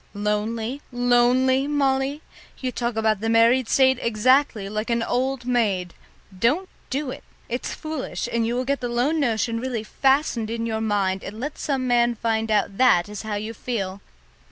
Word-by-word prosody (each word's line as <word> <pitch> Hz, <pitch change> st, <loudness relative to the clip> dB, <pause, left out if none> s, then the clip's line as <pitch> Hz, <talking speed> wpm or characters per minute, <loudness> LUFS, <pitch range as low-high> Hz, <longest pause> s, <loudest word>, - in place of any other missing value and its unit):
"Lonely, 220 Hz, +5 st, -2 dB
lonely, 245 Hz, +2 st, +3 dB
Molly? 275 Hz, 0 st, 0 dB, 0.3 s
You 255 Hz, -1 st, -3 dB
talk 240 Hz, -1 st, -2 dB
about 220 Hz, -2 st, +1 dB
the 225 Hz, -, -1 dB
married 230 Hz, +2 st, +4 dB
state 260 Hz, -2 st, +4 dB
exactly 235 Hz, -1 st, +2 dB
like 215 Hz, +3 st, -3 dB
an 235 Hz, -1 st, +1 dB
old 255 Hz, +1 st, -1 dB
maid. 205 Hz, -8 st, 0 dB, 0.4 s
Don't 280 Hz, -, +1 dB, 0.2 s
do 275 Hz, 0 st, -2 dB
it -, -, -9 dB, 0.2 s
it's 245 Hz, +2 st, -4 dB
foolish, 310 Hz, -4 st, -4 dB
and 230 Hz, -1 st, +1 dB
you 235 Hz, -, -1 dB
will 255 Hz, +1 st, -1 dB
get 280 Hz, +1 st, 0 dB
the 245 Hz, -, -2 dB
lone 255 Hz, +7 st, +1 dB
notion 230 Hz, -3 st, 0 dB
really 240 Hz, -3 st, -3 dB
fastened 265 Hz, -2 st, +1 dB
in 230 Hz, 0 st, -2 dB
your 220 Hz, -1 st, -2 dB
mind 195 Hz, -3 st, 0 dB
and 210 Hz, +3 st, -7 dB
let 290 Hz, +4 st, -5 dB
some 270 Hz, -3 st, -1 dB
man 240 Hz, -1 st, +3 dB
find 225 Hz, 0 st, -1 dB
out 205 Hz, -2 st, 0 dB
that 235 Hz, -9 st, +5 dB
is 210 Hz, -1 st, -6 dB
how 215 Hz, -1 st, -4 dB
you 215 Hz, +2 st, -4 dB
feel. 200 Hz, -5 st, -4 dB
235 Hz, 175 wpm, -23 LUFS, 220-260 Hz, 0.4 s, that